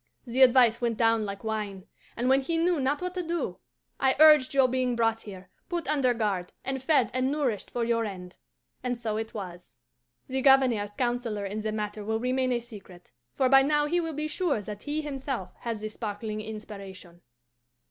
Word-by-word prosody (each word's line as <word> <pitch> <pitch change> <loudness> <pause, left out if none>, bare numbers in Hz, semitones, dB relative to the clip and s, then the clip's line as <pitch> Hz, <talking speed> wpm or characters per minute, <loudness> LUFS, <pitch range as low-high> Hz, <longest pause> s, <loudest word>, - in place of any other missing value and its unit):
The 250 +2 -1
advice 245 -2 +6
went 235 -2 0
down 225 -1 +3
like 200 +1 -6
wine; 210 -3 -4 0.3
and 245 - 0
when 265 +1 +4
he 330 +5 -2
knew 340 -1 +2
not 280 +5 0
what 365 0 -3
to 365 - -2
do, 340 0 -3 0.4
I 265 0 +3
urged 305 -3 +7
your 270 -2 +4
being 255 -1 0
brought 225 -1 +1
here, 190 -3 -10 0.2
put 345 -4 -3
under 275 -4 +2
guard, 200 -6 -1
and 265 -1 -2
fed 265 -4 +2
and 255 +1 0
nourished 270 -9 -1
for 240 - -2
your 230 0 +1
end. 185 -4 -7 0.4
And 245 -1 -2
so 220 -2 -3
it 220 0 -5
was. 180 - -8 0.5
"The 265 0 -2
Governor's 260 -6 +4
counsellor 240 -4 -1
in 205 +2 -4
the 215 0 -2
matter 210 0 -4
will 220 +1 -1
remain 255 +1 0
a 240 -1 0
secret, 195 - -13 0.2
for 260 - +2
by 270 +1 +7
now 295 +1 +2
he 345 +4 +1
will 325 -2 -3
be 305 +1 -2
sure 310 - 0
that 205 0 -7
he 300 +1 -3
himself 270 -9 -4
had 230 -2 -3
the 215 - -4
sparkling 215 0 -5
inspiration. 200 -5 -9
240 Hz, 195 wpm, -27 LUFS, 210-270 Hz, 0.5 s, urged